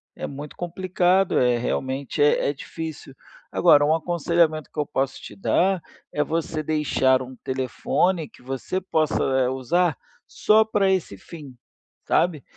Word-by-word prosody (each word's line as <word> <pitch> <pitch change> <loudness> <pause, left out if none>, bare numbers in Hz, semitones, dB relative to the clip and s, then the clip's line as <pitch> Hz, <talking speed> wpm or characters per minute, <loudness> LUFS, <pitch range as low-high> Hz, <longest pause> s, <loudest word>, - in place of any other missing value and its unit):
é - - -5
muito 145 +1 -8
complicado, 180 +1 +1
eh, 125 -1 +3
realmente, 130 +4 -2
é 145 -1 +3
é - - -1
difícil. 150 -1 -8 0.4
Agora, 150 -4 +5
um 155 +2 +3
aconselhamento 165 -1 0
que - - -6
eu 150 - +1
posso 135 -2 -2
te - - -11
dar, 190 -1 +1 0.3
é 150 - +1
você 160 +1 -2
deixar 145 -4 +1
um 130 +1 -10
telefone 135 +6 -1
que - - -20
você 135 +8 -3
possa 145 -7 +1
usar 145 +6 0 0.3
só 215 +1 +4
para 205 -3 +1
esse 180 - -1
fim, 145 - -11 0.5
sabe? 160 -6 +1
155 Hz, 145 wpm, -23 LUFS, 135-175 Hz, 0.5 s, Agora